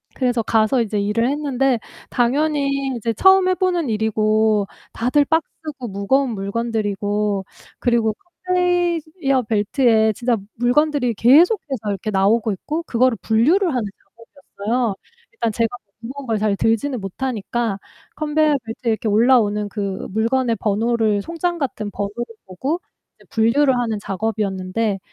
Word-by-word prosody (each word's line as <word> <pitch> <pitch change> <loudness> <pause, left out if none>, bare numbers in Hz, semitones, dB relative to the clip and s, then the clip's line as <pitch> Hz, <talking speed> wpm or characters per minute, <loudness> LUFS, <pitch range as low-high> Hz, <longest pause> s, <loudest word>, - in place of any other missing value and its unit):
그래서 245 -3 0
가서 220 +3 +2
이제 210 -2 -1
일을 215 +5 +1
했는데 270 -4 0 0.3
당연히 275 +1 +1
이제 230 0 -2
처음 380 - +5
해 370 - +2
보는 355 -6 0
일이고 215 -1 +1 0.3
다들 255 +5 +2
박스고 305 -4 -3
무거운 240 +7 +1
물건들이고 205 -1 -2 0.3
그리고 235 -3 +2 0.3
컨베이어 345 -6 +1
벨트에 220 0 +3
진짜 240 +1 0 0.2
물건들이 250 +1 +2
계속해서 275 - +3
이렇게 200 +2 -3
나오고 210 +3 +2
있고 305 - -4
그거를 250 -5 +1
분류를 310 - +3
하는 245 - 0 0.4
작업이었어요. 230 -4 -3 0.4
일단 230 -2 -1
제가 230 +1 0 0.3
무거운 265 +3 -8
걸 225 -2 0
잘 210 -1 +1
들지는 230 +2 0
못하니까 225 0 -3 0.4
컨베이어 305 0 +2
벨트에 230 +1 -2
이렇게 220 0 -2
올라오는 210 -2 +3
그 200 -2 -4
물건의 230 +2 +1
번호를 220 0 +1
송장 340 +1 -2
같은 220 -6 -3
번호를 205 +4 -4 0.2
보고 265 - -3 0.4
이제 - - -22
분류를 255 +5 +3
하는 225 -3 -1
작업이었는데 200 0 -2
235 Hz, 330 characters per minute, -20 LUFS, 215-275 Hz, 0.4 s, 처음